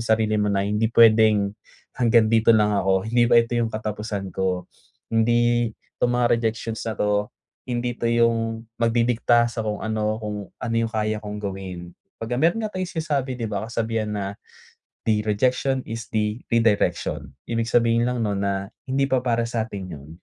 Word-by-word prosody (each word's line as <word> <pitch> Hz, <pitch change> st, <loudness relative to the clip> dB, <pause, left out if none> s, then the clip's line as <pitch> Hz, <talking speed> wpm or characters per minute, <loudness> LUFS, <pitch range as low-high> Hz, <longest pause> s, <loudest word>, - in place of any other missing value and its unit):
sarili 110 Hz, -1 st, +2 dB
mo 105 Hz, -1 st, +1 dB
na 100 Hz, -, +1 dB
hindi 105 Hz, +2 st, +1 dB
puwedeng 110 Hz, -3 st, +5 dB, 0.4 s
hanggang 115 Hz, -2 st, +4 dB
dito 115 Hz, +1 st, +5 dB
lang 105 Hz, -1 st, +3 dB
ako, 95 Hz, +1 st, +1 dB
hindi 120 Hz, +1 st, +3 dB
pa 120 Hz, -, +7 dB
ito 115 Hz, +1 st, -2 dB
yung 115 Hz, -1 st, 0 dB
katapusan 105 Hz, -2 st, -4 dB
ko, 95 Hz, -1 st, -2 dB, 0.4 s
hindi 120 Hz, 0 st, +2 dB, 0.3 s
'tong 120 Hz, -, +2 dB
mga 120 Hz, 0 st, +2 dB
rejections 115 Hz, 0 st, -3 dB
na -, -, -1 dB
to, 105 Hz, 0 st, +1 dB, 0.6 s
hindi 120 Hz, 0 st, -2 dB
ito -, -, -6 dB
yung 115 Hz, -1 st, +1 dB, 0.2 s
magdidikta 120 Hz, 0 st, +3 dB
sa 115 Hz, -, -5 dB
kung 105 Hz, -1 st, -3 dB
ano, 110 Hz, 0 st, -1 dB
kung 105 Hz, -1 st, -4 dB, 0.2 s
ano 115 Hz, 0 st, -2 dB
yung 115 Hz, 0 st, +1 dB
kaya 110 Hz, -1 st, 0 dB
kong 105 Hz, 0 st, -6 dB
gawin. 95 Hz, -3 st, -6 dB, 0.3 s
Pagka 120 Hz, +2 st, -2 dB
meron 170 Hz, +8 st, +3 dB
nga 215 Hz, -, -4 dB
tayong 185 Hz, -1 st, -3 dB
sinasabi 140 Hz, -4 st, -1 dB
di 115 Hz, -2 st, -3 dB
ba, 105 Hz, 0 st, -3 dB
kasabihan 115 Hz, -2 st, -2 dB
na, 100 Hz, -2 st, -2 dB, 0.8 s
"The 110 Hz, -1 st, +3 dB
rejection 130 Hz, +5 st, +1 dB
is 115 Hz, 0 st, -6 dB
the 105 Hz, +1 st, -1 dB
redirection," 105 Hz, -, +1 dB, 0.2 s
ibig 115 Hz, -1 st, -1 dB
sabihin 115 Hz, 0 st, +3 dB
lang 125 Hz, -2 st, -1 dB
nun 100 Hz, -1 st, -1 dB
na 100 Hz, 0 st, -1 dB, 0.2 s
hindi 135 Hz, +1 st, +1 dB
pa 130 Hz, -, +3 dB
para 115 Hz, -2 st, +1 dB
sa'tin 110 Hz, -5 st, -4 dB
yun. 70 Hz, +1 st, -13 dB
115 Hz, 170 wpm, -23 LUFS, 105-120 Hz, 0.8 s, pa